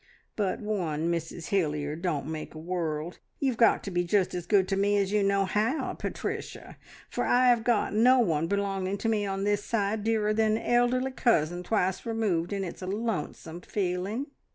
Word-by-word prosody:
"But 200 -1 -1
one 170 -7 -1
Mrs 165 0 -4
Hilliard 150 -4 -1
don't 155 -7 -1
make 155 +1 -6
a - - -7
world. 165 -1 -3 0.2
You've 265 -3 0
got 230 -2 +4
to 200 - -5
be 175 0 +1
just 185 +1 +1
as 175 -1 -4
good 195 -2 +4
to 195 - +1
me 205 +1 +2
as 200 -1 +1
you 210 0 +2
know 195 0 +2
how, 215 +9 0
Pat - - -5
ricia, - - -5 0.3
for - - -2
I've 245 -2 +4
got 230 -3 +1
no 245 +5 +5
one 165 -9 +2
belonging 195 0 -1
to 225 - -3
me 210 -2 +1
on 195 0 -2
this 205 0 +1
side 210 -1 -1
nearer 215 -1 +1
than 220 0 +2
an - - -6
elderly 245 +2 +2
cousin, 175 - +1
twice 185 -1 0
removed, 210 -7 -1
and 200 -1 -2
it's 175 - -8
a 185 - -5
lonesome 190 -5 -3
feeling. 195 +7 -2
200 Hz, 190 wpm, -28 LUFS, 175-220 Hz, 0.3 s, no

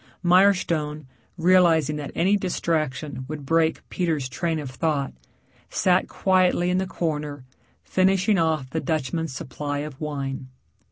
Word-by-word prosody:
Mirestone, 175 -5 +3 0.3
realizing 165 -4 +4
that 145 -2 -5
any 190 +4 +3
distraction 155 -8 -2
would 150 -1 -6
break 165 +2 +1
Peter's 160 -7 -1
train 160 +6 -2
of 145 -4 -5
thought, 140 -1 -1 0.6
sat 185 0 +2
quietly 185 -2 +2
in 180 - +2
the 190 - -1
corner 150 -6 -3 0.4
finishing 190 +2 +2
off 160 -5 +1
the 160 - -1
Dutchman's 160 0 -2
supply 145 +2 -4
of 150 -2 -10
wine. 135 -3 -4
160 Hz, 125 wpm, -24 LUFS, 145-180 Hz, 0.6 s, realizing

